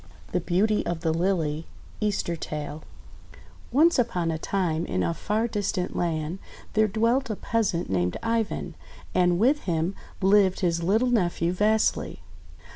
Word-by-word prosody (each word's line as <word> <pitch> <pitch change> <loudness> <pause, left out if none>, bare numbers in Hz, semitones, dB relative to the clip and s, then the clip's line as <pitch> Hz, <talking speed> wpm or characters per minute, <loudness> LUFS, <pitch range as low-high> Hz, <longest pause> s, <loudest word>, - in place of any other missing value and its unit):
THE 180 - +1
BEAUTY 200 +5 +1
OF 170 -1 -2
THE 160 -2 +1
LILY 165 -3 0 0.3
Easter 205 -5 -1
Tale 150 -1 -5 0.9
ONCE 315 +4 +4
upon 175 -8 0
a 160 - -3
time, 170 -3 -1
in 90 0 0
a 85 -1 0
far 215 - -1
distant 200 -4 -2
land, 165 +1 -2 0.3
there 215 0 +4
dwelt 230 +5 +1
a 215 - -1
peasant 200 -6 -1
named 90 -1 0
Ivan, 230 -1 -1 0.4
and 175 -1 +3
with 265 +9 +2
him 165 +1 0 0.3
lived 195 -1 +4
his 170 -2 +1
little 220 +8 +2
nephew 175 -5 +1
Vasily. 210 - +1
185 Hz, 140 wpm, -26 LUFS, 165-215 Hz, 0.9 s, ONCE